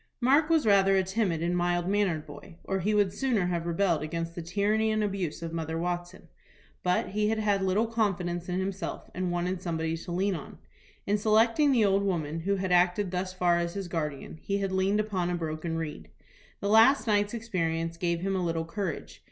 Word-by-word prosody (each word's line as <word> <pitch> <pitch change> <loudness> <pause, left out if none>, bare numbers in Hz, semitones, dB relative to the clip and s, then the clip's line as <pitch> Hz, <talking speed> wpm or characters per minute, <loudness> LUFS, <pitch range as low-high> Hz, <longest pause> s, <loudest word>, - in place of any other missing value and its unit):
Mark 280 +5 +3
was 320 -5 +3
rather 195 -2 +5
a 190 - +3
timid, 185 -4 -1
mild 175 0 0
mannered 190 -6 0
boy, 145 +3 -12
or 195 - -2
he 210 +4 0
would 205 -3 +2
sooner 245 -9 0
have 170 -1 -2
rebelled 170 -2 +1
against 165 +2 -4
the 170 - -5
tyranny 205 +6 +1
and 215 0 +1
abuse 190 -5 -3
of 165 0 -5
Mother 160 -1 -3
Watson. 175 +1 -4 0.5
But 180 0 +1
he 210 +2 0
had 220 - 0
had 205 -2 +1
little 190 +4 +2
confidence 185 -6 -1
in 180 +1 -1
himself, 195 +1 -4
and 180 -1 -2
wanted 175 +1 -2
somebody 160 -2 -2
to 165 +1 -8
lean 190 +3 +1
on. 160 - -7 0.5
In 205 +1 +1
selecting 230 +7 +3
the 235 -5 +4
old 195 0 +3
woman, 165 -5 -1
who 195 +4 0
had 190 -1 -2
acted 180 +2 +3
thus 185 0 -2
far 180 -2 +2
as 170 +1 -3
his 195 -2 -4
guardian, 155 -2 -4
he 200 - -1
had 195 -1 -2
leaned 190 +2 +1
upon 195 -5 -1
a 180 - 0
broken 165 0 -3
reed. 150 - -6 0.5
The 200 - -1
last 225 +3 +6
night's 205 0 +1
experience 165 -7 -2
gave 170 -1 -1
him 195 +1 -1
a 185 - 0
little 165 -1 -1
courage. 180 -2 -5
185 Hz, 200 wpm, -28 LUFS, 170-205 Hz, 0.5 s, last